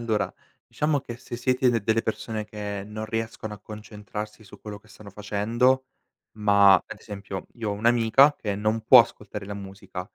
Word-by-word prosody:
Allora, 110 -2 -1 0.3
diciamo 150 -1 0
che 120 -2 -8
se 120 0 -8
siete 125 +1 +2
d 115 - +2
delle 110 +2 +1
persone 110 0 -3
che 105 -1 -5
non 110 +1 -6
riescono 110 -1 -4
a 105 - -14
concentrarsi 105 0 -8
su 95 - -14
quello 105 -1 -8
che 105 +1 -24
stanno 105 -1 -13
facendo, 115 +6 +1 0.5
ma 100 -2 +6
ad 105 - -2
esempio, 100 -2 -7
io 115 -3 -3
ho - - 0
un'amica 115 +6 +4
che 105 -6 -3
non 110 +2 0
può 125 +2 +9
ascoltare 105 -3 -5
la 100 - -5
musica, 95 -2 -8
105 Hz, 175 wpm, -25 LUFS, 105-115 Hz, 0.5 s, può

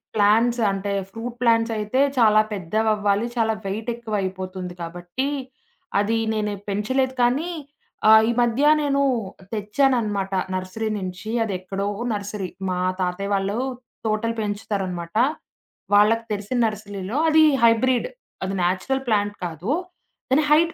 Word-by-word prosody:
Plants 225 +4 +3
అంటే, 195 +1 -2 0.2
fruit 230 +3 -6
ప్లాంట్సయితే 230 0 +2 0.2
చాలా 215 -3 +6
పెద్దవవ్వాలి, 210 +2 +1
చాలా 225 -2 +2
వెయిట్ 215 +4 -3
ఎక్కువయిపోతుంది 190 -5 -4
కాబట్టి, 175 +10 -4 0.7
అది 215 +3 +1 0.2
నేనే 210 -1 -1
పెంచలేదు. 260 +6 0
కానీ, 270 +8 +1 0.6
ఆ! - - +8 0.2
ఈ - - +3
మధ్య 240 +3 +1 0.2
నేను 280 -1 +1 0.5
తెచ్చాననమాట 210 -3 +1 0.2
నర్సరీ 185 +4 -3
నుంచి 185 +3 -6
అది 210 - -3
ఎక్కడో 195 +2 -3 0.3
నర్సరీ. 200 -2 -4 0.2
మా 180 0 -1 0.2
తాతయ్య 185 +3 -2
వాళ్ళు 195 +2 0 0.5
తోటలు 220 +1 0
పెంచుతారనమాట. 200 -4 -3 0.8
వాళ్ళకి 220 +3 +5
తెలిసిన 210 +4 -2
నర్సరీలో 205 +1 -4
అది 315 0 +6 0.2
హైబ్రిడ్. 240 - +4 0.4
అది 190 - -2
నేచురల్ 190 +10 0
ప్లాంట్ 205 -1 +1
కాదు. 170 +4 -5 0.6
కానీ, 285 +4 +4
హైట్ 330 +2 +5
210 Hz, 115 wpm, -23 LUFS, 195-230 Hz, 0.8 s, ఆ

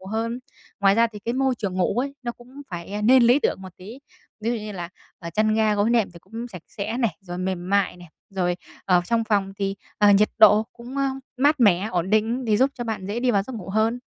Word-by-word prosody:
ngủ 190 - -13
hơn. 230 +4 -2 0.4
Ngoài 195 -1 +5
ra 230 +2 +4
thì 215 -2 -10
cái 235 +4 -3
môi 265 -1 +1
trường 200 -5 -4
ngủ 185 +5 +1
ấy, 280 0 -5
nó 240 -1 -3
cũng 255 +4 -13
phải, 175 +2 -7
ơ, 210 0 -3
nên 255 +3 +6
lý 245 +5 +5
tưởng - - -1
một 185 -2 -11
tí. 210 +8 -10 0.4
Ví 225 - -1
dụ 240 - 0
như 215 -1 -6
là, 175 -3 -5 0.3
ờ, 170 -1 -7
chăn 215 +4 +1
ga 220 -1 +2
gối 205 +3 +2
nệm 230 -5 +2
thì 170 - -12
cũng 230 +6 -8
sạch 180 -7 -10
sẽ 210 +2 -4
này, 225 -11 0
rồi 175 -2 -7
mềm 185 -1 -3
mại 200 -2 +2
này, 175 -1 -13 0.2
rồi 180 -2 -1 0.3
ở 180 -2 +4
trong 230 +1 0
phòng 200 -3 0
thì, 195 0 -2 0.2
ờ, 205 -1 +6
nhiệt 210 +2 +4
độ 215 0 +7
cũng, 245 +3 -10
ơ, 275 - +1 0.3
mát 285 +2 +3
mẻ, 200 -2 +4
ổn 180 +1 -1
định 225 +4 +1
để 215 -3 +2
giúp 265 +4 +3
cho 240 - -5
bạn 220 -5 -4
dễ 215 +4 -3
đi 250 0 +2
vào 200 -3 +2
giấc 260 - -9
ngủ 195 -4 -7
hơn. 220 +4 +1
215 Hz, 260 wpm, -24 LUFS, 195-235 Hz, 0.4 s, độ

